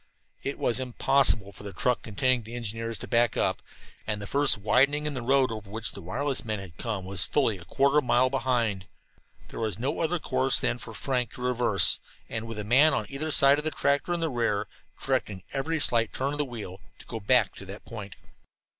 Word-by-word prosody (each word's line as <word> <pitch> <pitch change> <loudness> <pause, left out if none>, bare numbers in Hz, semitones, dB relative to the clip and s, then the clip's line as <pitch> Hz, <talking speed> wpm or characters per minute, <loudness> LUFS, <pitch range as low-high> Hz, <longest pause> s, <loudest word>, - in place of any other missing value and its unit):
It 140 - -4
was 120 +1 0
impossible 125 -4 +2
for - - -13
the 100 -1 -7
truck 125 +7 0
containing 125 +3 0
the 115 +2 -9
engineers 115 -1 -3
to - - -6
back 120 -1 +2
up. - - 0 0.5
And 105 -1 -2
the 100 - -7
first 140 +2 +5
widening 140 +8 +2
in 150 - -2
the 130 - -4
road 130 +1 +2
over 110 -2 -7
which 110 +2 +1
the - - -9
wireless 135 - -1
men 110 -2 -3
had 95 -4 -10
come 105 -5 -4
was 95 -2 0
fully 115 -9 +1
a 85 - -13
quarter 140 +5 +2
of - - -4
a - - -10
mile 125 +2 +3
behind. 115 -7 -1 0.6
There - - -8
was 110 -4 -2
no 130 +5 -2
other 170 +2 0
course 130 -3 +1
than 120 - -1
for - - -8
Frank 125 -3 -2
to 125 - -7
reverse, 120 -5 +3 0.3
and, 115 0 -5
with 115 -1 -7
a 105 - -4
man 135 +9 +4
on 110 - -2
either 145 +3 -4
side 140 -1 +6
of - - -5
the 155 - 0
tractor 140 +2 0
in 175 -1 -1
the 165 -2 -1
rear, 115 -4 -1 0.3
directing 95 -3 -2
every 155 +4 -1
slight 115 -5 +3
turn 135 +2 -2
of 145 - -5
the 145 - +1
wheel, 110 -7 -8 0.2
to - - -14
go 115 - -6
back 110 +1 +2
to 100 - -9
that 100 +2 -10
point. 105 -4 -8
120 Hz, 225 wpm, -27 LUFS, 105-135 Hz, 0.6 s, side